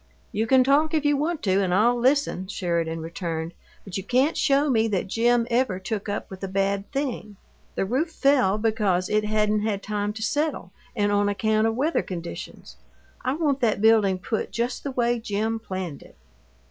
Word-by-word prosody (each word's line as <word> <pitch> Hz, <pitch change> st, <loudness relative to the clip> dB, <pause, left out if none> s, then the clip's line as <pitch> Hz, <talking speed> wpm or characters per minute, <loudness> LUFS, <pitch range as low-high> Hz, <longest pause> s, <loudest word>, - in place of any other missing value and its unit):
"You 220 Hz, +2 st, -1 dB
can 260 Hz, +1 st, +5 dB
talk, 295 Hz, +4 st, +3 dB
if 300 Hz, -1 st, 0 dB
you 290 Hz, 0 st, +4 dB
want 310 Hz, +3 st, -2 dB
to, 190 Hz, 0 st, +2 dB
and 185 Hz, -, -1 dB
I'll 220 Hz, +6 st, +4 dB
listen," 250 Hz, -6 st, +1 dB
Sheridan 170 Hz, -4 st, -2 dB
returned, 165 Hz, 0 st, -4 dB, 0.3 s
"but 195 Hz, -2 st, -6 dB
you 195 Hz, -, -4 dB
can't 260 Hz, -, +2 dB
show 280 Hz, +2 st, +2 dB
me 225 Hz, -5 st, +2 dB
that 200 Hz, -4 st, -1 dB
Jim 235 Hz, +4 st, +2 dB
ever 235 Hz, -5 st, +1 dB
took 205 Hz, +2 st, -4 dB
up 205 Hz, -, -3 dB
with 190 Hz, 0 st, -9 dB
a -, -, -1 dB
bad 195 Hz, +1 st, -1 dB
thing. 260 Hz, -7 st, -3 dB, 0.4 s
The -, -, 0 dB
roof 265 Hz, -, 0 dB
fell 270 Hz, -10 st, +3 dB
because 210 Hz, -5 st, 0 dB
it 210 Hz, 0 st, +1 dB
hadn't 210 Hz, 0 st, +1 dB
had 210 Hz, -2 st, -2 dB
time 210 Hz, 0 st, -2 dB
to 220 Hz, 0 st, -6 dB
settle 295 Hz, +6 st, -1 dB, 0.2 s
and 205 Hz, -2 st, +1 dB
on 205 Hz, 0 st, +2 dB
account 215 Hz, +2 st, +1 dB
of 225 Hz, -, -1 dB
weather 300 Hz, +7 st, +1 dB
conditions. 175 Hz, -2 st, -8 dB, 0.5 s
I 255 Hz, -, 0 dB
want 290 Hz, -3 st, 0 dB
that 220 Hz, -4 st, +2 dB
building 215 Hz, -3 st, +4 dB
put 220 Hz, +4 st, -3 dB
just 240 Hz, +2 st, -2 dB
the 280 Hz, -, -3 dB
way 240 Hz, -2 st, 0 dB
Jim 220 Hz, +1 st, -2 dB
planned 185 Hz, -8 st, -5 dB
it." -, -, -16 dB
215 Hz, 190 wpm, -25 LUFS, 195-255 Hz, 0.5 s, can